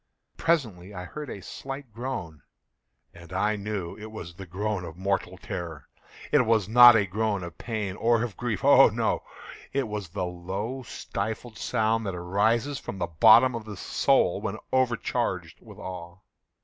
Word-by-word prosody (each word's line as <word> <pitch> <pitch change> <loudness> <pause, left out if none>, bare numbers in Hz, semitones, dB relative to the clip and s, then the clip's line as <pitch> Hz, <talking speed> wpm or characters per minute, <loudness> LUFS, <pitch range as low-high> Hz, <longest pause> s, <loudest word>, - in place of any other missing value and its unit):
Presently 105 - -1
I 90 - -5
heard 150 +9 -7
a 100 - -7
slight 135 -3 -7
groan, 110 - -5 0.7
and 85 -1 -14
I 105 +1 +1
knew 100 -4 -4
it 110 +1 -8
was 85 -6 -8
the 95 +2 -10
groan 100 +2 -2
of 85 -1 -8
mortal 95 -1 -1
terror. 85 -4 -6 0.4
It 145 -3 +5
was 110 -4 +2
not 120 +1 +9
a 105 -2 +3
groan 100 0 -1
of 85 -1 -9
pain 105 -5 -3
or 115 0 +2
of 115 -6 -4
grief—oh, 120 -5 +5
no!—it 135 -3 -3
was 105 -4 -5
the 90 +1 -3
low 95 +8 -4
stifled 110 0 -5
sound 110 -2 0
that 95 - -3
arises 110 +10 +1
from 95 - -7
the 90 - -1
bottom 115 +10 +6
of 115 -2 -5
the 105 -2 -8
soul - - +2
when - - -3 0.2
overcharged 130 -3 0
with - - -13
awe. 90 -1 -8
105 Hz, 160 wpm, -27 LUFS, 90-115 Hz, 0.7 s, not